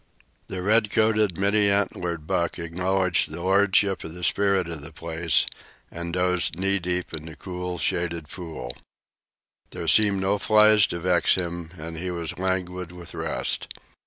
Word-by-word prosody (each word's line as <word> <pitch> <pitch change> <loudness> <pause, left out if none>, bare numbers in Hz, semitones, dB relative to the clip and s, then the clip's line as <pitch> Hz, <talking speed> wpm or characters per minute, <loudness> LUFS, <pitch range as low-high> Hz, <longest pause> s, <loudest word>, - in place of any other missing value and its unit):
The 90 -1 -4
red 105 +2 +3
coated, 110 -4 +2
many 100 +1 +3
antlered 90 -5 -1
buck 85 +2 -1
acknowledged 90 +2 0
the 80 +2 -7
lordship 95 0 +2
of 80 - -8
the 90 - -8
spirit 100 -2 +2
of 80 -3 -6
the 75 +2 -9
place 85 0 0 0.5
and 85 0 -5
dozed 90 -2 +1
knee 95 +1 +2
deep 90 0 -2
in 80 0 -6
the 80 - -9
cool, 90 +2 -5
shaded 85 -2 -1
pool. 80 -9 -7 0.9
There 85 - -6
seemed 100 +3 +4
no 95 +2 0
flies 105 -1 +5
to 85 - -4
vex 85 -1 +2
him 85 -2 -4
and 80 +1 -7
he 90 +3 -3
was 85 -1 -3
languid 90 -1 -2
with 90 -1 -11
rest. - - 0
90 Hz, 160 wpm, -25 LUFS, 85-95 Hz, 0.9 s, flies